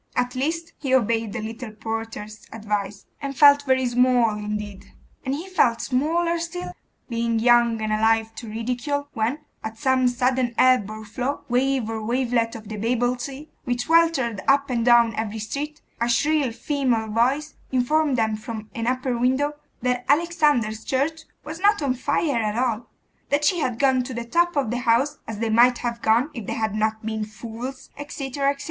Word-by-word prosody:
At 250 0 0
least, 330 +5 -2
he 265 -3 +1
obeyed 225 -3 +1
the 235 - -4
little 225 +2 -6
porter's 220 -1 -6
advice, 205 -2 -3 0.2
and 275 -1 -5
'felt 285 -1 +7
very 260 0 +3
small 245 -1 +3
indeed.' 210 -1 -6 0.3
And 265 0 -1
he 330 +6 -6
felt 240 -11 +2
smaller 335 +6 0
still, 345 +2 -5 0.4
being 230 -1 -1
young 235 0 +4
and 215 0 0
alive 225 +1 +2
to 230 - -7
ridicule, 250 +6 -3
when, 240 +6 -1 0.2
at 220 0 -6
some 260 +1 +2
sudden 250 -1 0
ebb 255 -6 +4
or 215 0 -8
flow, 250 +6 -3
wave 255 -1 +1
or 225 -1 -4
wavelet 235 0 0
of 220 -2 -9
the 215 0 -6
Babel 245 +3 +1
sea, 275 +4 -7
which 245 -1 -2
weltered 320 - +3
up 275 0 +3
and 235 -2 0
down 235 -1 +5
every 220 0 -3
street, 285 +8 -5 0.2
a 235 - +1
shrill 290 +1 +2
female 245 -4 -1
voice 265 +8 +1 0.2
informed 270 +2 +2
them 220 -1 +1
from 220 -1 -7
an 230 0 -3
upper 255 0 0
window, 260 +5 +1 0.3
that 250 0 0
Alexander's 290 -9 +2
church 315 +5 -1 0.2
was 315 +2 -6
not 410 +2 +4
on 270 -3 +1
fire 280 0 0
at 215 0 -1
all; 240 -2 -1 0.4
that 290 +1 +1
she 345 +4 +3
had 250 -6 -1
gone 265 -1 +3
to 250 0 -6
the 235 0 -4
top 345 +7 +1
of 265 -6 +1
the 245 - -1
house, 245 +4 +2
as 225 - -5
they 225 +1 -1
might 240 +2 +5
have 235 -1 -4
gone, 235 +7 +2
if 230 -6 -7
they - - -2
had 220 -2 -1
not 220 0 -1
been 220 -1 -2
fools, 235 +5 -8
etc. 280 -1 -2
etc. 280 0 -2
245 Hz, 180 wpm, -23 LUFS, 225-275 Hz, 0.4 s, felt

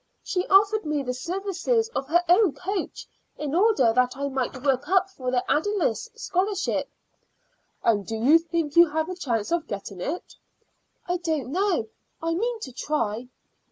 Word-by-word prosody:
She 365 -1 -2
offered 410 +2 +4
me 300 -2 -1
the 250 -1 -2
services 390 - -1
of 275 - -4
her 345 +4 +3
own 360 -1 +5
coach 385 +1 -4 0.3
in 300 -2 -4
order 340 - +4
that 250 +2 +2
I 280 0 -2
might 260 -1 -3
work 275 +2 +1
up 380 0 +3
for 255 -9 -4
the 250 0 +1
Ayldice 390 - 0
Scholarship." 390 -2 -1 0.9
"And 215 -3 +3
do 225 - -5
you 270 +9 +5
think 330 -3 -3
you 340 -1 +7
have 315 +2 -1
a 365 - -4
chance 235 - -2
of 340 -2 0
getting 200 -2 -6
it?" 330 - -5 0.7
"I 355 0 0
don't 315 -7 -2
know. 365 - +1 0.3
I 330 0 -1
mean 460 +6 -1
to 260 - -6
try." 235 -4 -2
325 Hz, 165 wpm, -25 LUFS, 255-380 Hz, 0.9 s, you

